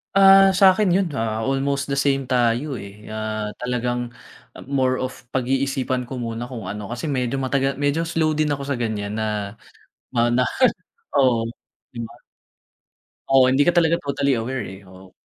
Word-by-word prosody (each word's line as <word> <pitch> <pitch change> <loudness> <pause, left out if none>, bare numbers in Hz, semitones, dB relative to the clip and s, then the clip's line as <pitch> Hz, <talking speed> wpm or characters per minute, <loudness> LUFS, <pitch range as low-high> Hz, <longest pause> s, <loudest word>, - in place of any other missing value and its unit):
Ah, 195 0 +8
sakin 195 +1 +5
yun 195 -2 +2
ha 110 0 -1
almost 135 +1 -1
the 140 - 0
same 135 -1 +2
tayo, 125 +2 +1
eh. 100 0 -9 0.2
Ah, 110 -1 -3
talagang 125 -1 -2 0.5
more 130 -2 +1
of 125 -1 -7
pag-iisipan 130 -1 -1
ko 130 - -6
muna 120 0 -4
kung 120 -5 -7
ano 105 -1 -6
kasi 120 +6 -4
medyo 130 -1 -1
matagal 135 0 0
medyo 145 +3 0
slow 160 -2 +1
din 155 0 +1
ako 140 -1 -2
sa 130 -4 -1
ganyan 105 -3 -3
na 105 -2 -2 0.6
na 120 +2 +2 0.7
oo, 125 -4 +3 0.5
di 120 - -10
ba? 120 +1 -17 1.1
Oo 130 -1 +5
hindi 145 +4 +3
ka 175 - +3
talaga 170 0 +3
totally 140 -3 0
aware, 125 +1 -3
eh, 95 0 -10
oh. 95 0 -15
130 Hz, 155 wpm, -22 LUFS, 115-140 Hz, 1.1 s, Ah